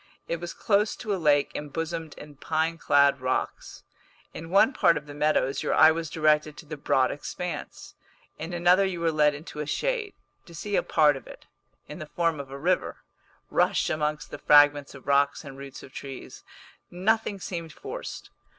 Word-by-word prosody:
It 170 - -2
was 175 0 -6
close 210 0 +1
to 215 -3 -3
a 190 - -3
lake 145 -2 +3
embosomed 165 +2 -5
in 150 0 -12
pine 160 +2 -1
clad 140 -1 +3
rocks. 130 0 -3 0.5
In 165 +1 -8
one 200 +9 +4
part 170 -9 +4
of 150 - -7
the 145 - -10
meadows 145 -2 +1
your - - 0
eye 155 - +8
was 165 -1 -3
directed 155 -1 +1
to - - -11
the 155 +1 -6
broad 130 -3 +1
expanse, 180 +4 -6 0.5
in 160 +3 -5
another 175 +2 +4
you 190 -3 -2
were 165 -1 +1
led 150 -1 +3
into 150 0 -9
a 150 - -3
shade, 460 - -2 0.3
to 170 - -12
see 205 +5 -3
a - - +3
part 150 -3 +3
of 135 - -10
it, - - -13 0.4
in 150 - -9
the 155 - -7
form 165 -3 0
of 140 -1 -7
a 135 - -7
river, 180 +6 -1 0.5
rush - - +2
amongst 150 -1 -2
the - - -7
fragments 145 -1 +5
of 135 - -13
rocks 140 +1 +2
and 135 -1 -10
roots 140 -1 -9
of 130 - -13
trees; 135 -2 -9 0.5
nothing 205 +2 0
seemed 170 -3 -6
forced. 465 +4 -8
155 Hz, 185 wpm, -26 LUFS, 145-175 Hz, 0.5 s, eye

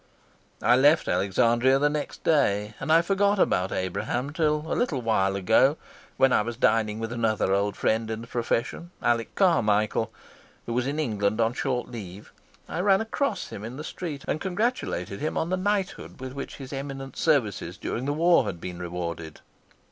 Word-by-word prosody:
I 120 +2 +6
left 145 +4 +4
Alexandria 115 +8 +3
next 150 0 -4
day, 105 -9 +2
and - - -2
I 165 +1 +6
forgot 200 +2 +2
about 95 - +2
Abraham 120 +8 -2
till 150 -1 +1
a 160 - -2
little 165 - 0
while 95 -4 +2
ago, 115 +9 +3 0.4
when 135 -1 +4
I - - +4
was 115 +2 -4
dining 110 -3 +2
with 115 0 -4
another 110 -4 +1
old 100 +1 +1
friend 110 0 0
in 110 0 -3
the - - -8
profession, 120 +7 -2
Alec 115 -1 0
Carmichael, 110 - +2 0.5
who 120 - -3
was 125 +2 0
in 145 +2 -2
England 110 -6 0
on 115 +1 +2
short 125 -1 -2
leave. 100 -4 -9 0.3
I - - -4
ran 195 +1 +4
across 275 +5 -2
him 100 - -8
in 120 +4 -7
the 150 - -6
street 155 -4 -6
and 155 - -1
congratulated 185 - -2
him 155 - -2
on 165 - -1
the - - +3
knighthood 195 -4 -2
with 130 0 -6
which 140 0 -6
his 135 -1 -8
eminent 135 -1 -6
services 110 - 0
during 125 - -4
the 145 - 0
war 170 +3 +4
had 85 -4 -4
been 90 0 -7
rewarded. 85 -2 -5
120 Hz, 180 wpm, -26 LUFS, 105-155 Hz, 0.5 s, I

